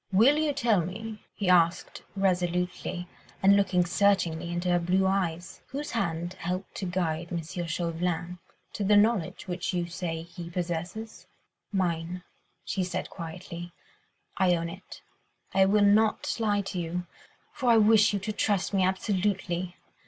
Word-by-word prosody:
"Will 245 +10 +5
you 310 -1 +2
tell 230 -8 +2
me," 215 +5 -6
he 200 - -4
asked 175 -1 +3
resolutely, 180 -1 -1 0.4
and 195 +1 +7
looking 190 -3 +3
searchingly 175 -3 +2
into 175 +1 -2
her 175 - +4
blue 185 +3 +2
eyes, 180 -3 -1
"whose 290 +2 -5
hand 175 -5 -2
helped 180 +3 -3
to 190 - -3
guide 170 -2 -1
M. 175 - -2
Chauvelin 170 +1 -3 0.3
to 205 - -3
the 205 +1 +5
knowledge 205 -6 +1
which 180 0 -2
you 175 -1 0
say 170 -2 -4
he 170 0 -9
possesses?" 175 +3 -4 0.4
"Mine," 175 -2 -1 0.4
she 190 - -1
said 180 - -4
quietly, 170 0 -7 0.6
"I 180 -2 +4
own 170 0 -2
it—I 190 +3 -4
will 205 +1 +4
not 215 +2 +3
lie 205 -2 +2
to 195 -2 -4
you, 175 +1 -3 0.5
for 255 -4 0
I 230 - +7
wish 215 0 +6
you 205 - 0
to 215 +3 -3
trust 205 -2 0
me 195 -1 +3
absolutely. 185 -2 -1
180 Hz, 145 wpm, -28 LUFS, 175-200 Hz, 0.6 s, and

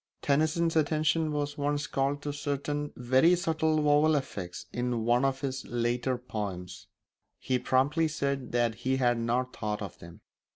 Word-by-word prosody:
Tennyson's 155 +3 +2
attention 155 +1 +2
was 145 0 -3
once 145 +1 0
called 140 +1 -1
to 145 - -3
certain 145 0 -3
very 130 +8 +4
subtle 160 -2 +1
vowel 150 +1 +4
effects 95 -11 -4
in 120 -2 -1
one 120 +2 +3
of 135 0 0
his 135 -2 -3
later 120 +1 0
poems; 100 -7 -6 0.5
he 130 -1 -1
promptly 140 +6 +2
said 140 -4 -2
that 120 -1 +2
he 130 +1 +1
had 120 -2 +2
not 125 +2 -1
thought 105 -1 -3
of 95 - -8
them. 85 0 -13
135 Hz, 155 wpm, -29 LUFS, 120-150 Hz, 0.5 s, very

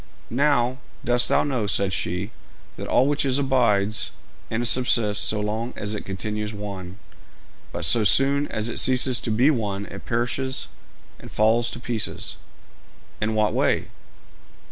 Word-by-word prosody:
'Now, 130 -1 +2 0.3
dost 120 0 +3
thou - - +3
know,' 130 -7 -1
said 100 -1 +2
she, 90 +5 -2 0.4
'that - - -7
all 125 - +3
which 145 +1 +1
is 135 -1 +2
abides 115 -7 +2 0.4
and 120 +2 -1
subsists 115 -4 +3
so 105 - +1
long 110 +3 -3
as 105 +1 -3
it 105 - -5
continues 105 +2 -4
one, 95 -2 -7 0.7
but - - -2
so 115 -2 +4
soon 140 +7 +3
as 110 +1 -2
it 115 - -2
ceases 130 -1 +3
to - - -4
be 125 +7 +4
one 100 -6 -2
it - - -10
perishes 125 +3 -1 0.5
and - - -11
falls 115 +2 +2
to - - -7
pieces?' 120 -3 -2 0.8
'In 110 +1 0
what 105 -1 +2
way?' - - +1
115 Hz, 150 wpm, -24 LUFS, 105-130 Hz, 0.8 s, so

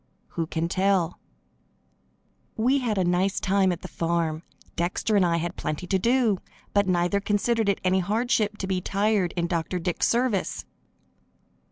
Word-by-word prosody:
Who 165 -1 -3
can 165 0 -1
tell? 185 -1 +1 1.4
We 255 +5 +2
had 230 -5 -1
a 190 - +2
nice 180 +3 +1
time 190 -1 +2
at 175 - -4
the - - -5
farm. 165 -2 -1 0.3
Dexter 180 +5 0
and 200 - +5
I 170 -1 +2
had 175 +2 -3
plenty 155 +4 -3
to 190 +1 +1
do, 230 -2 +2 0.3
but 200 -1 +3
neither 180 +2 +2
considered 210 +2 +1
it 200 - +1
any 185 +1 +3
hardship 215 +2 0
to 195 - -3
be 190 -1 -1
tired 200 -2 +1
in 170 - +1
Dr. 170 +1 -2
Dick's 175 0 0
service. 235 -4 0
190 Hz, 160 wpm, -25 LUFS, 175-210 Hz, 1.4 s, and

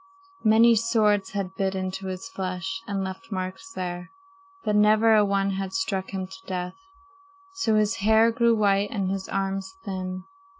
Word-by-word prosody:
Many 225 +2 +6
swords 210 -3 +2
had 195 -2 -3
bit 190 0 -1
into 190 0 -4
his 185 0 -5
flesh 190 +4 -4
and 200 -2 -2
left 190 +4 -7
marks 185 - -5
there, 180 - -5 0.5
but 210 - 0
never 215 +2 +5
a 215 -1 +6
one 200 -1 +1
had 190 0 -4
struck 195 -10 -2
him 190 -1 -3
to 190 +5 -13
death. 180 -1 -3 0.8
So 305 - +1
his 215 +1 +2
hair 220 +3 +4
grew 235 0 +3
white 200 -1 +2
and 195 -3 -2
his 195 -1 -4
arms 195 +1 -2
thin. 185 -1 -4
195 Hz, 165 wpm, -25 LUFS, 190-220 Hz, 0.8 s, Many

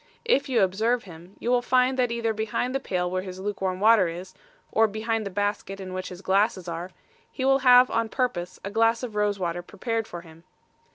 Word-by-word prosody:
If 285 -12 +2
you 250 - +3
observe 220 +6 +1
him, 175 +1 -13
you 240 - -2
will 245 -1 +3
find 255 +1 +2
that 245 -2 +2
either 230 -1 -1
behind 220 +4 -2
the 270 - 0
pail 180 -7 -2
where 185 0 -1
his 185 -1 -8
luke 205 0 -4
warm 185 -1 -1
water 215 -2 +5
is, 180 +3 -7 0.4
or 225 0 +4
behind 220 0 -2
the - - -4
basket 205 0 -2
in 185 -1 -7
which 185 0 -4
his 180 +1 -10
glasses 190 -1 +1
are, 170 +2 -5 0.4
he 260 - -3
will 270 0 +4
have 250 -1 +6
on 230 -1 0
purpose 190 -10 -2
a 200 - -5
glass 225 +2 +2
of 240 -3 -5
rose 210 -1 +1
water 175 -2 -2
prepared 225 +4 -3
for 175 - -7
him. 165 -1 -16
205 Hz, 220 wpm, -26 LUFS, 185-235 Hz, 0.4 s, have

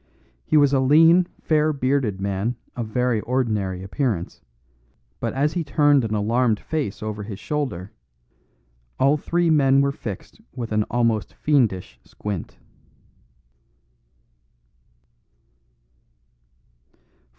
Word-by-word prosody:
He 155 - +3
was 145 -1 +4
a 135 - +4
lean 165 +6 +5 0.2
fair 155 0 +2
bearded 130 -7 0
man 100 +4 -2 0.2
of 120 -3 -4
very 125 +1 0
ordinary 105 -7 -1
appearance, 100 - -3 0.8
but - - -2
as 145 +3 +1
he 175 - -1
turned 145 -2 +3
an 110 -1 -2
alarmed 110 +1 +1
face 145 -11 -4
over 105 -1 -4
his 100 -1 -7
shoulder, 130 - -3 1.1
all 140 +3 +4
three 170 +2 0
men 135 -3 +4
were 140 0 +2
fixed 105 -8 -8
with 120 -3 -5
an 105 0 +1
almost 115 -3 0
fiendish 110 - 0
squint. 100 -5 -6
125 Hz, 105 wpm, -23 LUFS, 105-145 Hz, 1.1 s, lean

